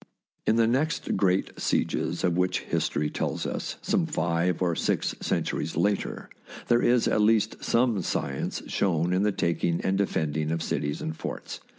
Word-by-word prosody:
In 110 - +4
the 115 0 +4
next 140 +8 0
great 95 -1 +1
sieges 85 - 0
of 90 -2 +2
which 90 +1 +1
history 75 0 -1
tells - - -2
us, - - -3
some 190 -4 +1
five 85 - 0
or 85 -3 +1
six - - 0
centuries - - -1
later, 100 0 0 0.4
there 120 0 +4
is 120 -1 +3
at 105 - +2
least 110 0 +2
some 115 -4 +2
science - - -2
shown 90 -2 +1
in 90 - +2
the 105 +1 +2
taking 85 -2 0
and 95 +1 0
defending 80 -5 0
of 80 0 -1
cities 75 -2 -2
and 80 - -3
forts. - - -6
95 Hz, 165 wpm, -27 LUFS, 85-115 Hz, 0.4 s, In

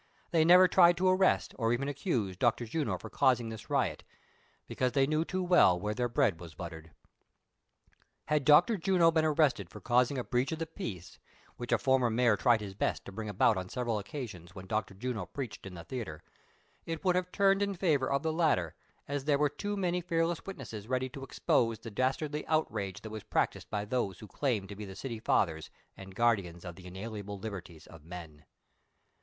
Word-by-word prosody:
They 165 -2 +4
never 180 +3 +8
tried 175 -1 +6
to 185 +1 +2
arrest, 185 0 +3
or 115 0 +2
even 135 +3 -1
accuse, 125 - -1
Dr. 120 +4 +1
Juno 145 +6 -2
for - - -10
causing 120 -3 +2
this 110 -1 -9
riot; - - 0 0.6
because 125 -1 -1
they 135 0 +4
knew 155 +3 +1
too 185 +2 -2
well 175 - +5
where 105 +3 -2
their 120 +2 -1
bread 120 - +1
was 85 -3 -11
buttered. 80 -1 -8 1.4
Had 150 -2 +1
Dr. 165 - +6
Juno 175 -2 +4
been 160 -1 +2
arrested 150 - +2
for 105 - -10
causing 125 +6 +2
a 125 - -1
breach 125 +5 0
of 160 - -2
the 165 - -3
peace, 95 - -7 0.4
which 120 0 -6
a 120 - +5
former 130 0 +2
mayor 115 -1 +3
tried 115 +1 +3
his 100 -2 -6
best 95 - -2
to - - -8
bring 110 +2 -5
about 105 +1 +3
on 95 0 -4
several 120 -3 -1
occasions, 100 - -8
when 95 - -8
Dr. 105 -1 -2
Juno 110 -3 -4
preached 105 -1 -6
in 90 - -9
the 85 - -8
theatre, 100 - -6 0.6
it 165 +3 -5
would 180 -1 +3
have 180 0 -1
turned 195 0 +3
in 200 -1 0
favor 155 -8 +1
of 140 0 +1
the 160 -1 0
latter, 150 - +1 0.3
as 140 -1 -3
there 145 -2 +3
were 150 0 +2
too 205 +7 -4
many 180 -2 0
fearless 165 -1 0
witnesses 115 - -7
ready 130 +1 -1
to 135 +1 -9
expose 115 -3 +1
the 115 - -9
dastardly 145 +6 -1
outrage 105 - -1
that 110 - -8
was 110 -1 -6
practised - - -1
by 105 -1 -2
those 105 -5 -1
who 105 - -11
claim 115 -5 -1
to 100 +1 -9
be 105 0 -7
tlie 95 - -9
city 120 -5 -5
fathers 80 -7 0 0.3
and 95 -1 -11
guardians 100 -8 +1
of 85 -1 -7
the 90 -1 -12
inalienable 100 +2 -6
liber 100 -1 -5
ties 80 -3 -15
of 80 -2 -14
men. 80 -3 -10
120 Hz, 205 wpm, -31 LUFS, 100-155 Hz, 1.4 s, never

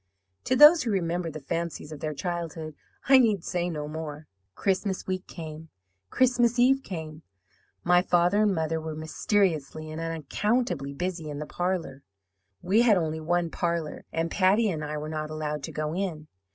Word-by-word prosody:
To 255 - +2
those 300 +5 +9
who 240 - -2
remember 175 -3 -1
the 155 0 -7
fancies 165 +1 -4
of 155 - -7
their 155 0 -3
childhood 165 -2 -4 0.3
I 265 0 +8
need 215 -8 +2
say 175 0 -1
no 150 -3 -4
more. 155 -1 -6 0.3
"Christmas 190 0 -1
week 185 0 -3
came, 160 -2 -8 0.4
Christmas 245 -2 +3
Eve 265 +3 +4
came. 160 -7 -7 0.6
My 175 0 +5
father 180 +3 +3
and 210 -1 +3
mother 160 0 -1
were 160 -1 -5
mysteriously 155 -2 -1
and 160 +1 -5
unaccountably 165 - -1
busy 175 -2 -3
in 145 - -5
the 150 - -4
parlour 175 -6 -3 0.6
(we 200 +6 +4
had 225 -5 +5
only 160 -2 -1
one 170 +1 0
parlour), 170 -3 -2
and 165 0 -1
Patty 205 +3 +3
and 155 -3 -4
I 150 0 -4
were 150 +1 -5
not 155 -1 -4
allowed 150 -1 -3
to - - -8
go 155 0 -3
in. 170 -5 -3
165 Hz, 170 wpm, -27 LUFS, 155-190 Hz, 0.6 s, those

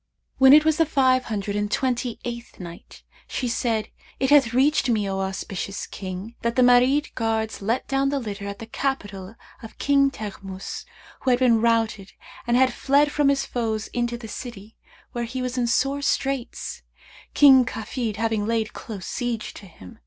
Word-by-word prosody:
When 265 0 +8
it 300 +2 +8
was 315 -1 +3
the 325 - +4
Five 260 -3 +3
Hundred 205 -2 -3
and 205 0 -1
Twenty 250 -2 -1
eighth 235 0 -7
Night, 170 -2 -11 0.2
She 255 - -3
said, 230 -2 -1 0.3
It 265 +1 +1
hath 275 -6 +6
reached 265 +1 +2
me, 215 -4 +1
O 195 0 -2
auspicious 195 +1 -4
King, 190 +3 -7
that 235 0 -1
"the 255 - +4
Marid 250 +4 +4
guards 220 -1 -2
let 225 +6 -1
down 270 0 +1
the 285 - -1
litter 205 -5 -5
at 200 0 -6
the 225 - -8
capital 205 -6 -4 0.3
of 225 - -11
King 280 -1 +3
Teghmus 195 -5 -7 0.3
who 265 - -1
had 245 - +4
been 240 -3 +3
routed 225 -4 0 0.3
and 240 0 +3
had 260 0 +4
fled 285 +2 +2
from 295 -2 +2
his 280 -1 +1
foes 220 -3 -2
into 240 0 -2
the 235 -2 -9
city, 220 -2 -8 0.4
where 240 -1 -3
he 245 +3 -5
was 255 0 -3
in 245 -2 0
sore 275 +4 +1
straits, 270 -3 -2 0.5
King 270 -3 +8
Kafid 230 -1 -4
having 220 -1 -1
laid 225 -1 -1
close 200 -6 -8
siege 240 -3 -3
to 200 - -12
him. 95 - -14
235 Hz, 180 wpm, -24 LUFS, 215-265 Hz, 0.5 s, When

